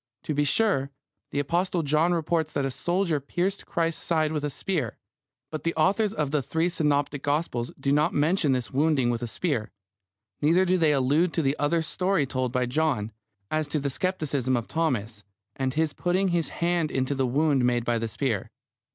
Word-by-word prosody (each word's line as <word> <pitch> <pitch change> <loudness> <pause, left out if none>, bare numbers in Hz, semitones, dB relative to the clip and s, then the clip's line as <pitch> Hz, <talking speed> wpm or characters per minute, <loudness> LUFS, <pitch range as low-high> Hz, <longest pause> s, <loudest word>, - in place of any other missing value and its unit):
To 155 - -2
be 145 0 +1
sure, 140 -5 +2 0.4
the - - -5
Apostle 170 +4 0
John 155 +4 +2
reports 165 -2 0
that 140 - 0
a 135 - -1
soldier 175 +1 0
pierced 175 +8 -2
Christ's 165 -3 -1
side 155 -2 +1
with 150 -2 -2
a 150 - 0
spear. 170 +3 -2 0.5
But 155 - -5
the 165 - -1
authors 200 +6 +2
of 150 -9 -1
the 150 -2 +1
three 160 +6 0
synoptic 145 -4 0
Gospels 145 -5 -1
do 140 - 0
not 150 +4 +3
mention 155 -1 +2
this 125 -3 -2
wounding 140 -3 +2
with 120 0 -2
the 120 - -2
spear. 125 -3 -2 0.7
Neither 170 +5 +4
do 185 0 +2
they 160 -2 +4
allude 145 +5 +2
to 165 - 0
the 135 +1 +1
other 160 +3 +1
story 180 -1 0
told 130 -2 -2
by 125 0 +1
John, 125 -5 0 0.4
as 155 -1 0
to 150 +1 -1
the 140 0 -2
scepticism 140 -5 0
of 115 - -4
Thomas, 120 -10 -2 0.3
and 130 0 -2
his 160 -1 +1
putting 185 +2 +1
his 170 -2 0
hand 170 -2 0
into 130 0 -1
the 135 -2 0
wound 140 +1 +2
made 120 -1 +1
by 120 -1 +1
the 115 - -2
spear. 110 -3 -2
150 Hz, 195 wpm, -26 LUFS, 135-170 Hz, 0.7 s, Neither